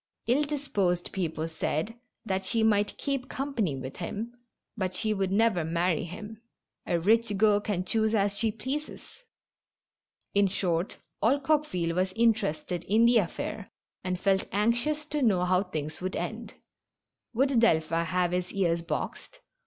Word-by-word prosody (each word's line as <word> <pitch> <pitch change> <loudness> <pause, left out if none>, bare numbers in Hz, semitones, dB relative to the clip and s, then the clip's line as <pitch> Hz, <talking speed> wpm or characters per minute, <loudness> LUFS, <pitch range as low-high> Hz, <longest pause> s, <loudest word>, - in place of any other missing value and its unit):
Ill 250 +5 +3
disposed 210 - -1
people 165 -4 -2
said 160 +5 -2 0.3
that 190 -2 -1
she 225 +4 +1
might 210 -2 +2
keep 275 -3 -2
company 240 - -1
with 130 0 -7
him, 215 +7 -4 0.4
but 185 -4 -2
she 215 +2 +1
would 195 -2 -1
never 205 -4 +3
marry 170 +1 0
him. 210 +5 -8 0.5
A 170 - +1
rich 215 +3 +2
girl 210 0 +5
can 195 -4 -2
choose 220 +2 +2
as 200 -1 +1
she 220 +1 +1
pleases. 265 +8 -5 1.3
In 200 0 +4
short, 180 -2 -1 0.2
all 255 +7 +3
Coque 300 +2 +2
ville 170 -2 -1
was 185 +1 0
interested 185 -7 +1
in 220 +4 +4
the 240 0 +6
affair, 205 +1 -2 0.3
and 180 -1 -2
felt 195 0 +2
anxious 240 +9 +1
to 300 0 -2
know 195 -8 +3
how 185 0 +3
things 155 -5 -5
would 185 +1 -3
end. - - -5 0.8
Would 265 0 +3
Delphin 165 -6 +3
have 180 0 +1
his 180 0 -1
ears 170 -4 +1
boxed? - - -5
200 Hz, 155 wpm, -28 LUFS, 180-230 Hz, 1.3 s, the